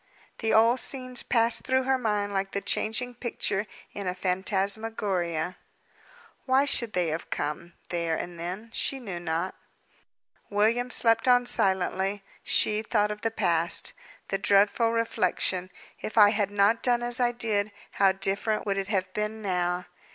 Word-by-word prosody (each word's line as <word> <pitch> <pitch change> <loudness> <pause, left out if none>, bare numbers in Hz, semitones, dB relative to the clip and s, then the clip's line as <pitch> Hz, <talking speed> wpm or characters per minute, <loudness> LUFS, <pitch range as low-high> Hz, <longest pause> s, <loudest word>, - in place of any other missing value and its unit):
The 225 - 0
old 230 +3 +5
scenes 255 -2 0
passed 230 -1 +2
through 260 0 +1
her 265 0 +1
mind 210 -3 -1
like 195 0 -2
the 200 - 0
changing 245 +5 -1
picture 220 -4 -2 0.3
in 200 -2 -5
a 180 - -2
phantasmagoria. 190 -2 -1 0.9
Why 265 +2 +4
should 235 -5 -2
they 175 -2 0
have 160 +2 -4
come, 150 +4 -4 0.2
there 170 -2 -1
and 175 +1 -6
then? 190 +7 -6
She 270 - -2
knew 195 -8 -6
not. 170 +2 -2 1.0
William 225 +4 +1
slept 230 0 +3
on 245 0 +5
silently; 190 -1 +2 0.2
she 215 0 +1
thought 210 -1 0
of 210 0 -7
the 225 - 0
past. 170 -6 +2 0.4
The 195 - -1
dreadful 205 +4 +3
reflection, 185 -5 0 0.3
"If 215 - -6
I 205 -1 +8
had 205 -2 0
not 205 +3 +2
done 240 -1 +2
as 240 +1 0
I 245 -1 +3
did, 215 -3 -1 0.2
how 195 -1 +3
different 200 +3 -1
would 200 -1 -1
it 195 - -4
have 190 -3 -2
been 210 +1 -3
now!" 180 -2 -1
205 Hz, 155 wpm, -27 LUFS, 185-230 Hz, 1.0 s, I